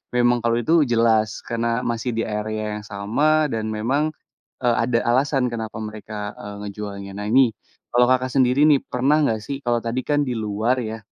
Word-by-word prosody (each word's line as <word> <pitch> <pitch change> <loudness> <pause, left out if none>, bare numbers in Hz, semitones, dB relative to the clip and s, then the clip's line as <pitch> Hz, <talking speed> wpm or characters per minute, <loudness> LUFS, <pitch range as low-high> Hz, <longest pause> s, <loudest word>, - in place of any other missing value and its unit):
memang 120 0 +3
kalau 115 0 +2
itu 160 +8 +1 0.2
jelas, 110 -2 +3 0.2
karena 115 0 -1 0.2
masih 120 +1 -1
di - - +1
area 105 0 -3
yang 105 - -12
sama, 150 +10 +2
dan 110 -1 -2
memang, 135 +9 0 0.5
e - - +2 0.2
ada 120 0 +1
alasan 130 0 +2
kenapa 110 -2 -5
mereka, 105 -1 -6
e - - -9 0.2
ngejualnya. 100 -1 -6
Nah 105 0 -4
ini, 130 -2 +5 0.4
kalau 120 0 +5
Kakak 130 0 +1
sendiri 130 +1 +3
nih 145 -3 +5
pernah 135 +5 +1
nggak 110 -5 +1
sih 140 - -4
kalau 120 -1 +2
tadi 120 +2 -2
kan 145 0 +3
di 125 - -1
luar 110 +4 0
ya, 110 0 -4
115 Hz, 185 wpm, -22 LUFS, 110-130 Hz, 0.5 s, ini